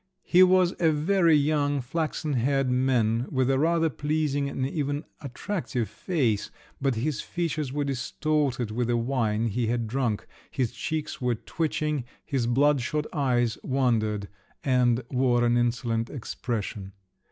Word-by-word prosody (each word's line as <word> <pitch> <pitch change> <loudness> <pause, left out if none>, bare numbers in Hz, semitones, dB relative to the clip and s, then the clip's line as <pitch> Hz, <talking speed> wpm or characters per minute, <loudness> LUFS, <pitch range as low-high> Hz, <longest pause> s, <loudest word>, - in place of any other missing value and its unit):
He 180 - +4
was 185 -1 +5
a 165 -2 +4
very 165 +2 +3
young 145 -1 +2
flaxen 155 +3 -2
haired 135 +1 +1
man, 125 -2 +2
with 130 -1 +1
a 135 - +2
rather 165 +1 +2
pleasing 145 -1 -1
and 130 -1 -2
even 145 0 -2 0.2
attractive 140 - -3
face, 115 - -1 0.3
but 135 -3 +1
his 130 +5 -1
features 160 -5 -2
were 145 +1 -1
distorted 140 -2 -1
with 120 +2 -1
the 120 0 +1
wine 115 -2 0
he 115 +2 -1
had 120 0 0
drunk, 115 -2 -1 0.2
his 125 -4 -1
cheeks 155 -3 -4
were 125 -1 +1
twitching, 150 +1 -2 0.2
his 130 -5 -1
blood 140 +3 +3
shot 150 +5 -1
eyes 120 -6 +1
wandered, 110 -6 0 0.4
and 125 -2 +2
wore 125 -2 +2
an 120 0 +3
insolent 120 -1 0
expression. 110 -6 -4
130 Hz, 140 wpm, -27 LUFS, 120-150 Hz, 0.4 s, was